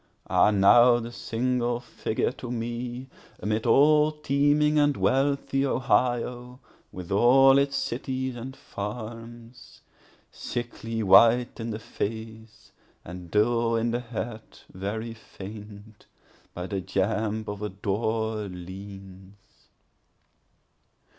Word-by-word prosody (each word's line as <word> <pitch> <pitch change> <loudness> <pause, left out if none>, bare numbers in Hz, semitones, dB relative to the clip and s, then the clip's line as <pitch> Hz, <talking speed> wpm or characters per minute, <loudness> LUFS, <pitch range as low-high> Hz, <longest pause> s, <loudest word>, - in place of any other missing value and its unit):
4Ah, - - +5
now, 120 +5 +6
the 115 0 -7
single 120 +1 -1
figure 120 -2 -2
to 125 -1 -9
me, 120 +1 -4 0.3
Amid 110 +3 -2
all 150 +5 +5
teeming 150 0 +2
and 145 -1 +2
wealthy 135 0 +1
Ohio, 125 -1 0 0.3
with 90 0 -9
all 135 +6 +6
its 140 0 0
cities 130 +1 -3
and 130 +3 -7
farms, 115 +3 -8 0.5
Sickly 115 -2 -5
white 115 +6 +5
in 115 0 -4
the 105 - -3
face, 110 0 -7 0.3
and 90 0 -9
dull 115 +3 +2
in 115 +1 0
the 120 - -1
head, 115 -2 -5 0.3
very 110 +5 -4
faint, 105 0 -12 0.5
By 90 - -4
the 95 0 -3
jamb 105 +3 -1
of 105 0 -5
a 105 - -3
door 110 +3 -2
leans. 95 +1 -10
115 Hz, 110 wpm, -26 LUFS, 105-125 Hz, 0.5 s, now